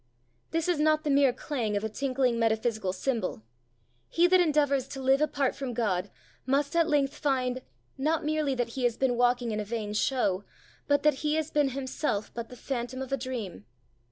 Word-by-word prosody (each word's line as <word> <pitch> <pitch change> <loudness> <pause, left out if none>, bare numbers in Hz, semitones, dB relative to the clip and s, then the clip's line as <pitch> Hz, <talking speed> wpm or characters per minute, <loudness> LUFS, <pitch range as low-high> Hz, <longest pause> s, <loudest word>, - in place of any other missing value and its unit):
This 330 +1 -1
is 350 -4 +1
not 310 0 +3
the 295 - 0
mere 275 -2 +5
clang 240 -5 -2
of 205 - -3
a - - 0
tinkling 255 +1 0
metaphysical 220 -3 +1
cymbal; 205 - -2 0.7
he 340 - +3
that 365 +1 +5
endeavours 290 -5 +2
to 270 0 -7
live 265 +2 +3
apart 285 -3 +1
from 265 -4 -4
God 200 -5 0 0.3
must 280 +3 0
at 335 -1 +3
length 285 -1 +2
find 255 -3 0 0.4
not 310 +3 0
merely 305 -3 0
that 245 -2 -1
he 255 +2 -4
has 235 -2 +1
been 260 -2 +1
walking 245 -1 +2
in 215 - -2
a - - -1
vain 210 -1 -4
show, 210 -4 +1 0.4
but 285 0 +2
that 300 -3 +4
he 300 0 +1
has 315 -1 -1
been 295 -2 +2
himself 260 -4 -3
but 235 -1 -6
the 250 - -10
phantom 250 0 -4
of 265 0 -5
a - - +2
dream. 230 - -6
265 Hz, 195 wpm, -28 LUFS, 235-290 Hz, 0.7 s, mere